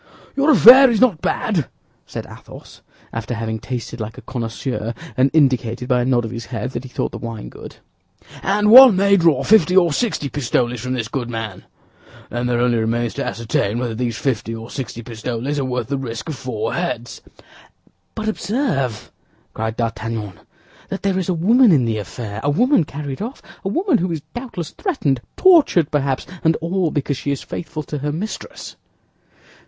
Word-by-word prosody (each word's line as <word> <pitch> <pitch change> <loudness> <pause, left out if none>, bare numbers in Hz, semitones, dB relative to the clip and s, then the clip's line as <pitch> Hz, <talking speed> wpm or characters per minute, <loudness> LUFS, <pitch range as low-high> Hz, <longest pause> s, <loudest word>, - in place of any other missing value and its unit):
"Your 280 +2 +2
affair 265 -2 +9
is 230 -3 +1
not 210 -11 +3
bad," 190 - 0 0.4
said - - -6
Athos, - - -13 0.3
after 115 +1 -4
having 110 0 -3
tasted 120 -1 -5
like 110 +1 -6
a - - -11
connoisseur 120 -1 -4 0.2
and 130 +2 +3
indicated 125 -5 +1
by 125 -1 +2
a - - 0
nod 125 -2 +2
of 115 - -5
his 115 -1 -7
head 125 0 -4
that 120 - -4
he 130 - -10
thought - - -3
the - - -7
wine 115 -3 -6
good; - - -11 0.7
"and 210 +2 +2
one 255 -3 +10
may 200 +1 +4
draw 165 -7 +3
fifty 185 -4 +4
or 170 -4 +4
sixty 170 -7 -1
pistoles 125 -3 -1
from 125 +1 -3
this 115 -3 -3
good 120 0 -4
man. 115 -5 -5 0.7
Then 120 +1 -2
there 120 -1 +1
only 120 -1 +2
remains 115 +1 -1
to - - -3
ascertain 110 -2 -1
whether 120 -2 -2
these 115 -1 -2
fifty 115 -4 -2
or 115 +1 -9
sixty 120 -3 -6
pistoles 120 +4 -4
are 135 - -1
worth 125 -2 -2
the 140 -1 -1
risk 115 0 -6
of 155 - -3
four 115 -4 -4
heads." 125 -10 -4 0.9
"But 220 0 -4
observe," 175 - -2 0.4
cried 110 +1 -3
D'Artagnan, 115 -3 -3 0.6
"that 195 - -5
there 195 -1 +1
is 185 - -3
a 180 - +1
woman 225 +7 +5
in 135 -7 +4
the 110 -2 -1
affair—a 110 +4 -5
woman 240 - +3
carried 140 0 -6
off, 240 +6 -5 0.2
a 195 - -2
woman 340 - +1
who 180 0 -1
is 160 -3 -3
doubtless 240 - -6
threatened, 155 - -1 0.2
tortured 305 - +5
perhaps, 140 -3 0 0.2
and 160 0 +3
all 175 +1 -1
because 145 -2 -2
she - - -4
is 140 - -2
faithful 160 -2 -6
to 150 +1 -5
her 145 +2 -2
mistress." 190 +9 -6
135 Hz, 180 wpm, -20 LUFS, 115-180 Hz, 0.9 s, one